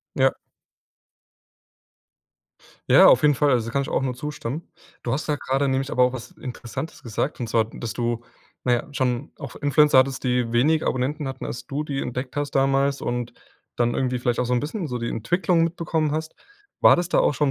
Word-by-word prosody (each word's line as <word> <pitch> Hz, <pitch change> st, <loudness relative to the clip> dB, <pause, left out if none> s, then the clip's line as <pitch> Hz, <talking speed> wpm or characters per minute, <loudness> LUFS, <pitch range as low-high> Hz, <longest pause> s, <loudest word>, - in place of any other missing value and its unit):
Ja. 135 Hz, -1 st, +3 dB, 2.6 s
Ja, -, -, +8 dB
auf -, -, +6 dB
jeden 150 Hz, -1 st, +5 dB
Fall. 145 Hz, +2 st, +2 dB
Also, 120 Hz, -4 st, +2 dB
da 115 Hz, -, -6 dB
kann 140 Hz, -, +1 dB
ich -, -, -6 dB
auch -, -, 0 dB
nur 130 Hz, -2 st, -1 dB
zustimmen. 150 Hz, +2 st, -5 dB, 0.3 s
Du 120 Hz, -, -2 dB
hast 145 Hz, -, -2 dB
da 150 Hz, -1 st, 0 dB
grade 135 Hz, 0 st, 0 dB
nämlich 135 Hz, +1 st, -1 dB
aber 125 Hz, -, +2 dB
auch 125 Hz, 0 st, +4 dB
was 125 Hz, -3 st, -8 dB
Interessantes 130 Hz, +4 st, -7 dB
gesagt. 120 Hz, +5 st, -3 dB
Und 120 Hz, -, -2 dB
zwar, 115 Hz, -1 st, +2 dB
dass 115 Hz, 0 st, -7 dB
du, 120 Hz, -1 st, -2 dB, 0.4 s
na 125 Hz, -, +1 dB
ja, 120 Hz, -, -3 dB
schon 130 Hz, 0 st, -1 dB
auch 140 Hz, -, -8 dB
F -, -, -14 dB
Influencer 145 Hz, 0 st, +4 dB
hattest, 130 Hz, 0 st, +2 dB
die 125 Hz, -2 st, 0 dB
wenig 150 Hz, +7 st, +3 dB
Abonnenten 140 Hz, +4 st, -1 dB
hatten, 135 Hz, -1 st, -5 dB
als 120 Hz, -, -6 dB
du 145 Hz, +2 st, -3 dB
die 140 Hz, -2 st, -3 dB
entdeckt 125 Hz, +2 st, -5 dB
hast 145 Hz, 0 st, -1 dB
damals, 135 Hz, +1 st, +2 dB
und 120 Hz, 0 st, -3 dB, 0.4 s
dann 120 Hz, 0 st, +1 dB
irgendwie 125 Hz, -1 st, 0 dB
vielleicht 120 Hz, -1 st, -1 dB
auch -, -, +2 dB
so 125 Hz, -, -2 dB
'n 125 Hz, -, +2 dB
bisschen 165 Hz, +4 st, -4 dB
so 125 Hz, -3 st, -4 dB
die 115 Hz, -, -3 dB
Entwicklung 170 Hz, -, +1 dB
mitbekommen 165 Hz, -2 st, -1 dB
hast. 160 Hz, +1 st, -3 dB, 0.5 s
War -, -, +8 dB
das 175 Hz, 0 st, -1 dB
da -, -, +3 dB
auch -, -, +3 dB
schon 145 Hz, 0 st, +1 dB
135 Hz, 210 wpm, -24 LUFS, 125-150 Hz, 2.6 s, Ja